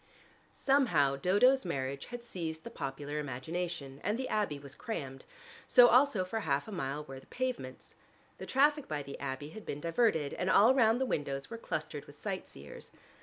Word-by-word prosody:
Somehow 175 Hz, -, +3 dB
Dodo's 205 Hz, -, +4 dB
marriage 140 Hz, -5 st, -3 dB
had 245 Hz, -1 st, -7 dB
seized 160 Hz, -7 st, -5 dB
the -, -, -8 dB
popular 145 Hz, +2 st, -4 dB
imagination, 145 Hz, +1 st, -4 dB
and 210 Hz, +3 st, 0 dB
the 260 Hz, 0 st, -3 dB
Abbey 205 Hz, -9 st, 0 dB
was 140 Hz, -1 st, -10 dB
crammed, 135 Hz, -, -6 dB, 0.4 s
so 245 Hz, -1 st, +8 dB
also 250 Hz, -7 st, +4 dB
for 220 Hz, +5 st, -3 dB
half 145 Hz, -7 st, -1 dB
a -, -, -7 dB
mile 145 Hz, -5 st, -3 dB
were 135 Hz, -2 st, -9 dB
the -, -, -20 dB
pavements. 245 Hz, -, -4 dB, 0.5 s
The -, -, -7 dB
traffic 290 Hz, +2 st, +3 dB
by 150 Hz, -2 st, -3 dB
the 140 Hz, 0 st, -8 dB
Abbey 140 Hz, +1 st, -4 dB
had 215 Hz, +6 st, -10 dB
been 145 Hz, -, -5 dB
diverted, 165 Hz, -2 st, +1 dB
and 185 Hz, -, -1 dB
all 220 Hz, +7 st, +6 dB
round 230 Hz, -2 st, +4 dB
the 265 Hz, -, +1 dB
windows 140 Hz, -, -3 dB
were 230 Hz, -, -6 dB
clustered 155 Hz, -6 st, -4 dB
with 145 Hz, 0 st, -16 dB
sight 195 Hz, -3 st, -4 dB
seers. -, -, -11 dB
165 Hz, 180 wpm, -32 LUFS, 140-230 Hz, 0.5 s, so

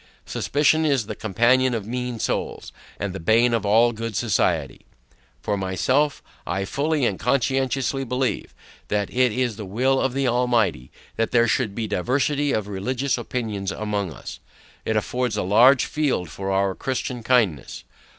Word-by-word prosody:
Suspicion 150 Hz, +2 st, +1 dB
is 140 Hz, -7 st, +1 dB
the -, -, -5 dB
companion 120 Hz, +5 st, +2 dB
of 110 Hz, -3 st, -4 dB
mean 125 Hz, +1 st, -4 dB
souls, -, -, -3 dB, 0.3 s
and 100 Hz, -3 st, -3 dB
the 95 Hz, -, -6 dB
bane 115 Hz, +7 st, +3 dB
of 110 Hz, -3 st, 0 dB
all 115 Hz, +3 st, +5 dB
good 115 Hz, -1 st, -5 dB
society. 110 Hz, 0 st, 0 dB, 0.6 s
For 105 Hz, -, 0 dB
myself, 130 Hz, +10 st, 0 dB, 0.2 s
I 95 Hz, +2 st, -1 dB
fully 145 Hz, +4 st, 0 dB
and 100 Hz, -, -1 dB
conscientiously 135 Hz, +2 st, 0 dB
believe, 130 Hz, +1 st, -2 dB, 0.4 s
that 105 Hz, -1 st, -1 dB
it 125 Hz, -1 st, +3 dB
is 120 Hz, -1 st, -1 dB
the 110 Hz, -, -6 dB
will 130 Hz, +7 st, +1 dB
of 130 Hz, -, 0 dB
the 135 Hz, 0 st, 0 dB
Almighty, 115 Hz, -, +1 dB, 0.3 s
that 115 Hz, -, +1 dB
there 120 Hz, -1 st, +3 dB
should 110 Hz, -2 st, 0 dB
be 115 Hz, -, -2 dB
diversity 140 Hz, +8 st, 0 dB
of 105 Hz, -2 st, -1 dB
religious 125 Hz, +7 st, -1 dB
opinions 110 Hz, -5 st, -3 dB
among 105 Hz, -4 st, -3 dB
us: -, -, -9 dB, 0.5 s
It 110 Hz, -, 0 dB
affords 125 Hz, +1 st, -1 dB
a -, -, 0 dB
larger 120 Hz, +8 st, +5 dB
field 135 Hz, -, -1 dB
for 95 Hz, +4 st, -5 dB
our 95 Hz, 0 st, +1 dB
Christian 125 Hz, +1 st, -3 dB
kindness. 110 Hz, -, 0 dB
120 Hz, 160 wpm, -23 LUFS, 105-130 Hz, 0.6 s, all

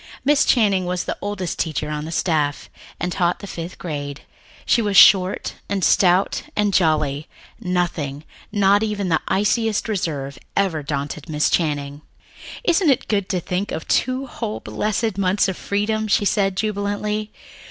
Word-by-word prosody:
Miss 290 Hz, 0 st, +4 dB
Channing 200 Hz, -7 st, +3 dB
was 180 Hz, 0 st, -1 dB
the -, -, -3 dB
oldest 200 Hz, -4 st, -4 dB
teacher 155 Hz, -2 st, -2 dB
on 150 Hz, 0 st, -3 dB
the 160 Hz, -, -6 dB
staff, 155 Hz, -4 st, -1 dB, 0.3 s
and 180 Hz, -, -2 dB
taught 175 Hz, 0 st, +1 dB
the -, -, -9 dB
fifth 175 Hz, -2 st, -7 dB
grade. 145 Hz, -4 st, -5 dB, 0.4 s
She 235 Hz, -, +3 dB
was 205 Hz, -3 st, +1 dB
short 190 Hz, -1 st, +6 dB, 0.2 s
and 200 Hz, -2 st, -1 dB
stout 185 Hz, +2 st, +3 dB
and 205 Hz, -1 st, +1 dB
jolly; 155 Hz, -4 st, +1 dB, 0.3 s
nothing, 175 Hz, -7 st, -2 dB, 0.3 s
not 205 Hz, 0 st, +4 dB
even 210 Hz, -3 st, -1 dB
the 160 Hz, -, +2 dB
iciest 215 Hz, +2 st, +1 dB
reserve, 150 Hz, -10 st, -3 dB, 0.2 s
ever 180 Hz, -6 st, +1 dB
daunted 145 Hz, +1 st, -4 dB
Miss 150 Hz, -1 st, +1 dB
Channing. 145 Hz, -3 st, -1 dB, 0.6 s
"Isn't 345 Hz, -6 st, +3 dB
it 265 Hz, -, +2 dB
good 200 Hz, -3 st, 0 dB
to 185 Hz, -, 0 dB
think 185 Hz, +4 st, -3 dB
of 160 Hz, -, -5 dB
two 255 Hz, +2 st, +1 dB
whole 225 Hz, -4 st, -5 dB
blessed 215 Hz, -1 st, -2 dB
months 195 Hz, +1 st, +2 dB
of 190 Hz, -, -2 dB
freedom?" 215 Hz, +3 st, -1 dB
she 205 Hz, 0 st, +2 dB
said 195 Hz, -2 st, +1 dB
jubilantly. 210 Hz, 0 st, -2 dB
190 Hz, 155 wpm, -21 LUFS, 160-210 Hz, 0.6 s, short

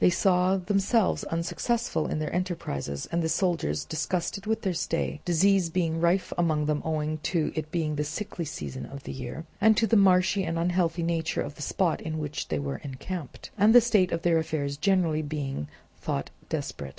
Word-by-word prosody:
They -, -, +6 dB
saw 180 Hz, +1 st, +3 dB
themselves 195 Hz, +3 st, +1 dB
unsuccessful 175 Hz, +4 st, -1 dB
in -, -, -2 dB
their 155 Hz, 0 st, -3 dB
enterprises, 75 Hz, -, -3 dB
and 170 Hz, +1 st, +1 dB
the 160 Hz, -, 0 dB
soldiers 160 Hz, -, 0 dB
disgusted 180 Hz, +5 st, -2 dB
with 220 Hz, 0 st, 0 dB
their 190 Hz, -3 st, +1 dB
stay; 165 Hz, -2 st, -2 dB
disease 180 Hz, +1 st, +3 dB
being 165 Hz, -1 st, 0 dB
rife 175 Hz, +3 st, +2 dB
among 155 Hz, -3 st, +2 dB
them 150 Hz, -1 st, 0 dB
owing 155 Hz, -1 st, -1 dB
to 160 Hz, +1 st, 0 dB
its 155 Hz, -1 st, -3 dB
being 155 Hz, -2 st, -1 dB
the 150 Hz, -, 0 dB
sickly 170 Hz, +4 st, -4 dB
season 70 Hz, -, -6 dB
of 140 Hz, 0 st, -9 dB
the -, -, -6 dB
year, 130 Hz, +5 st, -6 dB, 0.2 s
and 220 Hz, +1 st, +6 dB
to 230 Hz, -, +4 dB
the 225 Hz, -, +2 dB
marshy 190 Hz, -1 st, +4 dB
and 165 Hz, -2 st, -2 dB
unhealthy 170 Hz, 0 st, +1 dB
nature 165 Hz, -1 st, 0 dB
of -, -, -4 dB
the -, -, -12 dB
spot 170 Hz, +3 st, 0 dB
in 155 Hz, 0 st, -4 dB
which 150 Hz, -1 st, -4 dB
they 80 Hz, -, -1 dB
were 70 Hz, -1 st, -3 dB
encamped; 145 Hz, +3 st, -7 dB
and 215 Hz, +4 st, +6 dB
the -, -, +12 dB
state 215 Hz, -6 st, +3 dB
of 165 Hz, 0 st, -2 dB
their 170 Hz, -2 st, +4 dB
affairs 155 Hz, -3 st, -2 dB
generally 170 Hz, -1 st, +2 dB
being 145 Hz, -, -4 dB, 0.3 s
thought 70 Hz, -, -3 dB, 0.2 s
desperate. -, -, -4 dB
165 Hz, 190 wpm, -27 LUFS, 150-185 Hz, 0.3 s, the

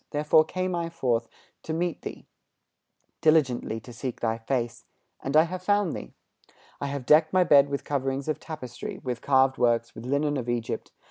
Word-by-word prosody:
Therefore 150 Hz, +1 st, +4 dB
came 185 Hz, +2 st, -2 dB
I 170 Hz, -1 st, -2 dB
forth 120 Hz, -8 st, -1 dB, 0.3 s
to 160 Hz, -, -4 dB
meet 170 Hz, 0 st, -2 dB
thee, -, -, -8 dB, 1.0 s
Diligently 140 Hz, -8 st, +2 dB
to 120 Hz, -, -12 dB
seek 120 Hz, +2 st, -5 dB
thy 115 Hz, -1 st, -1 dB
face, 120 Hz, 0 st, -2 dB, 0.4 s
And 135 Hz, +3 st, +1 dB
I 155 Hz, -, +8 dB
have 180 Hz, +2 st, -5 dB
found 205 Hz, -2 st, +1 dB
thee. 60 Hz, -, -8 dB, 0.6 s
I 140 Hz, -, -2 dB
have 140 Hz, -2 st, -4 dB
decked 155 Hz, +4 st, +5 dB
my 185 Hz, -1 st, +5 dB
bed 145 Hz, -4 st, +6 dB
with 140 Hz, 0 st, -3 dB
coverings 135 Hz, 0 st, -2 dB
of 155 Hz, -, -1 dB
tapestry, 130 Hz, -7 st, -7 dB
With 125 Hz, -2 st, -3 dB
carved 130 Hz, -1 st, +3 dB
works, 120 Hz, -1 st, +2 dB
with 115 Hz, +2 st, -9 dB
linen 145 Hz, +2 st, +1 dB
of 120 Hz, -2 st, -4 dB
Egypt. 120 Hz, -1 st, -3 dB
140 Hz, 180 wpm, -27 LUFS, 120-160 Hz, 1.0 s, I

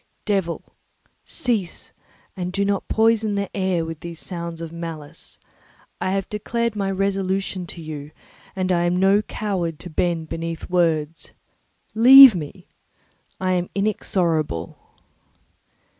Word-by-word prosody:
"Devil, 195 Hz, -5 st, -1 dB, 0.6 s
cease; 220 Hz, -9 st, -3 dB, 0.4 s
and 180 Hz, -2 st, -4 dB
do 200 Hz, +2 st, 0 dB
not 200 Hz, -1 st, -1 dB
poison 220 Hz, -1 st, +2 dB
the 200 Hz, -1 st, -3 dB
air 185 Hz, -4 st, 0 dB
with 165 Hz, -1 st, -7 dB
these 170 Hz, -1 st, -8 dB
sounds 170 Hz, -2 st, -6 dB
of 165 Hz, -1 st, -6 dB
malice. 165 Hz, -2 st, -8 dB, 0.6 s
I 185 Hz, -, 0 dB
have 195 Hz, -1 st, -1 dB
declared 230 Hz, +2 st, -2 dB
my 200 Hz, -2 st, -1 dB
resolution 195 Hz, -1 st, -1 dB
to 170 Hz, 0 st, -8 dB
you, 150 Hz, -2 st, -7 dB, 0.5 s
and 185 Hz, -1 st, -1 dB
I 175 Hz, -1 st, +2 dB
am 175 Hz, +1 st, +1 dB
no 195 Hz, +2 st, +4 dB
coward 190 Hz, -8 st, -3 dB
to 175 Hz, -, -9 dB
bend 165 Hz, 0 st, -1 dB
beneath 165 Hz, +1 st, -5 dB
words. 165 Hz, -3 st, 0 dB, 0.6 s
Leave 260 Hz, +2 st, +10 dB
me; 175 Hz, +2 st, -7 dB, 0.7 s
I 185 Hz, 0 st, 0 dB
am 180 Hz, -1 st, 0 dB
inexorable." 170 Hz, -, -1 dB
180 Hz, 130 wpm, -22 LUFS, 165-200 Hz, 0.7 s, Leave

